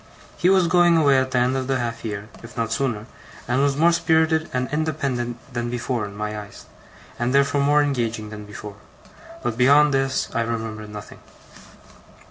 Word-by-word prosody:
He 180 - +2
was 190 -2 +5
going 175 -1 +4
away 140 -4 +5
at 130 0 -1
the 130 - -1
end 125 +2 +2
of 130 -1 -2
the 135 -1 +1
half 120 -1 -4
year, 105 -2 -5
if 115 +2 -12
not 115 -1 -1
sooner, 115 -3 -1 0.4
and 125 +3 +1
was 140 -1 +1
more 170 +3 +5
spirited 160 -1 +2
and 125 0 -1
independent 140 -6 -1 0.2
than 120 -1 -2
before 120 -1 -2
in 100 0 -9
my 105 0 -3
eyes, 105 -1 -11 0.5
and 120 +3 0
therefore 140 +1 +3
more 145 +1 +4
engaging 115 -6 -2
than 105 -1 -8
before; 105 0 -9 0.7
but 120 0 -2
beyond 145 +3 +5
this 135 0 0
I 115 - +1
remember 110 -2 -4
nothing. 105 0 -10
125 Hz, 180 wpm, -23 LUFS, 115-145 Hz, 0.7 s, was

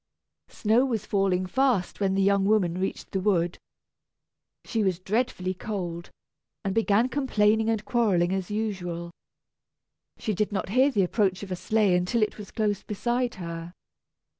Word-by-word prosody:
Snow 225 +4 +2
was 235 -6 -1
falling 190 -2 +1
fast 245 -3 +1
when 195 -1 +1
the 195 - +2
young 200 0 +3
woman 190 -4 +2
reached 190 - -3
the 190 - 0
wood. 180 -3 +1 1.1
She 225 -3 0
was 190 -3 +1
dreadfully 190 -1 -1
cold, 175 -4 -5 0.6
and 195 - 0
began 225 +1 +3
complaining 220 -5 +2
and 220 -2 -1
quarrelling, 190 -7 +2
as 190 -2 -2
usual. 180 -5 -3 1.1
She 215 - -2
did 210 +2 -1
not 195 -2 -2
hear 255 +6 +4
the 205 -8 +2
approach 190 0 0
of 195 - -8
a - - 0
sleigh 210 0 +2
until 180 +6 +1
it 215 - -2
was 205 - -8
close 210 -2 -1
beside 240 +3 -1
her. 170 0 -7
200 Hz, 155 wpm, -26 LUFS, 185-220 Hz, 1.1 s, hear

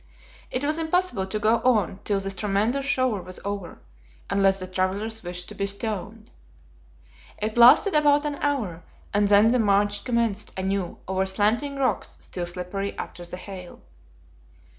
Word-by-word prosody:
It 255 - -2
was 305 +3 0
impossible 325 - 0
to 215 - -2
go 220 +2 +3
on 210 -7 +1
till 200 -2 0
this 195 0 -3
tremendous 215 +8 0
shower 255 -7 +1
was 185 +1 -9
over, 200 -3 -4 0.5
unless 195 -1 +3
the 185 - -5
travelers 195 +4 -2
wished 180 0 -4
to - - -8
be 200 - -2
stoned. 210 +1 -5 1.1
It 215 +1 -3
lasted 245 - +7
about 295 -1 +4
an 290 -1 -2
hour, 225 - -1 0.3
and 205 0 +3
then 205 +2 +6
the 250 - +2
march 205 -1 +2
commenced 230 -4 -1
anew 190 -1 -2
over 190 0 0
slanting 220 +9 +1
rocks 275 -2 -1
still 175 -2 -5
slippery 180 +3 -4
after 175 - -7
the 175 +1 -7
hail. 185 -1 -9
205 Hz, 155 wpm, -25 LUFS, 190-240 Hz, 1.1 s, lasted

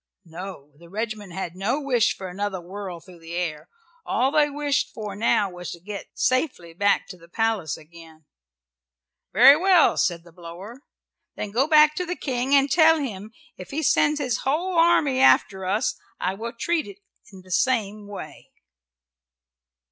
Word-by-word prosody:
No! 170 -3 -9
the 170 0 -16
regiment 215 -1 -5
had 180 -2 -5
no 205 +9 -1
wish 250 -6 +1
for 190 - -6
another 195 +1 -4
whirl 185 0 -7
through 175 +1 -16
the 165 +1 -8
air. 165 -2 -4 0.3
All 260 -1 +1
they 300 -1 +3
wished 290 -1 -1
for 210 -3 -7
now 205 -2 +1
was 180 0 -8
to 170 - -11
get 200 +3 -8
safely 255 - 0
back 200 +4 +1
to 185 - -9
the 170 -1 -18
palace 220 -7 -1
again. 160 -1 -16 1.1
"Very 255 +7 +8
well," 360 +1 +4
said 170 -2 0
the 170 - -17
blower. 180 +8 -11 0.5
"Then 205 - -5
go 255 +7 +1
back 305 -1 +6
to 360 - -1
the 360 - -2
King 260 -1 0
and 275 0 +3
tell 320 +1 +6
him 215 -7 -5 0.3
if - - -10
he 310 +2 -3
sends 295 +1 +3
his 250 -6 -1
whole 340 +7 -1
army 330 -6 +3
out - - +8
after 190 -1 -9
us 210 +6 0 0.2
I 185 - -1
will 230 +4 -6
treat 320 +4 -1
it 200 -1 -11 0.3
in 190 -2 -13
the 185 - -15
same 210 -2 0
way." 205 -1 -10
210 Hz, 170 wpm, -24 LUFS, 180-275 Hz, 1.1 s, Very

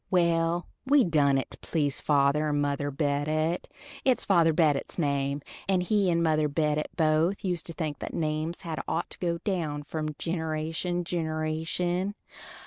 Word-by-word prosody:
Well, 170 -1 +2 0.2
we 275 0 +5
done 145 -6 +3
it 135 - -3
to - - -10
please 145 -4 -1
father 145 +1 +3
and 145 0 +1
mother 145 0 0
Bedott; 150 +3 0 0.4
it's 255 -2 +2
father 170 -4 +4
Bedott's 155 -3 +1
name, 140 -2 0 0.3
and 185 -2 +3
he 200 0 +2
and 170 -1 +2
mother 155 -2 +3
Bedott 150 0 0
both 160 +5 +2
used 175 -3 -1
to 165 - -4
think 155 -3 -3
that - - -5
names 155 +1 -2
had 165 -4 -4
ought 170 - -2
to - - -10
go 170 -2 0
down 165 -5 -2
from 155 0 -4
gineration 165 +2 -2
to 180 - -3
gineration. 160 +4 -1
160 Hz, 160 wpm, -28 LUFS, 150-175 Hz, 0.4 s, we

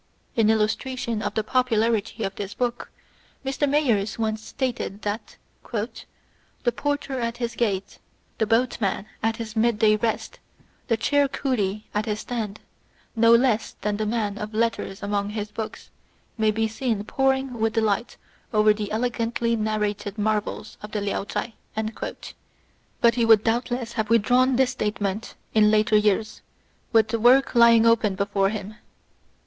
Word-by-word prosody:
In 225 -2 +3
illustra 220 +4 +1
tion 230 -3 -2
of - - -3
the 220 - +1
popularity 225 -2 +1
of 195 - -2
this 200 -1 -6
book, 245 -1 -2 0.6
Mr. 275 +2 0
Mayers 235 -9 +1
once 220 -1 -1
stated 240 -5 -4
that 205 +2 -4 0.3
"the 235 +2 -5
porter 285 -2 -2
at 235 0 -2
his 235 -1 -3
gate, 200 -5 -2 0.4
the 220 - +2
boat 235 +3 +1
man 195 0 -1 0.2
at 225 0 0
his 225 -1 -6
mid 225 0 +2
day 215 0 +4
rest, 225 +1 -2 0.5
the 230 -4 +2
chair 285 +5 +2
coolie 220 -7 -1
at 210 +2 -1
his 210 0 -2
stand, 220 -4 -4 0.5
no 230 0 +5
less 235 -2 +2
than 210 -1 -1
the 215 0 -1
man 210 -2 -1
of 210 +1 -6
letters 220 -3 -1
among 200 0 -1
his 210 0 -4
books, 220 0 -7 0.4
may 220 -2 +2
be 220 +1 +1
seen 220 -2 -2
poring 265 +2 0
with 220 0 +1
delight 220 0 0 0.3
over 215 -2 +5
the 210 -1 -5
elegantly 235 0 0
narrated 210 -1 -2
marvels 210 0 -2
of 210 - -9
the 210 - -1
Liao 200 0 -2
Chai;" 230 - -4 1.5
but 235 0 +5
he 235 0 +1
would 220 -2 +6
doubtless 240 +1 -1
have 220 -2 -2
withdrawn 245 +3 +4
this 260 0 +2
judgment 210 -2 -3 0.2
in 215 -1 +5
later 215 0 +3
years, 210 0 +1 0.5
with 220 -1 +4
the 230 0 -1
work 255 +4 +5
lying 235 -1 +6
open 225 -4 +3
before 200 0 +1
him. 215 0 -6
220 Hz, 155 wpm, -24 LUFS, 210-235 Hz, 1.5 s, would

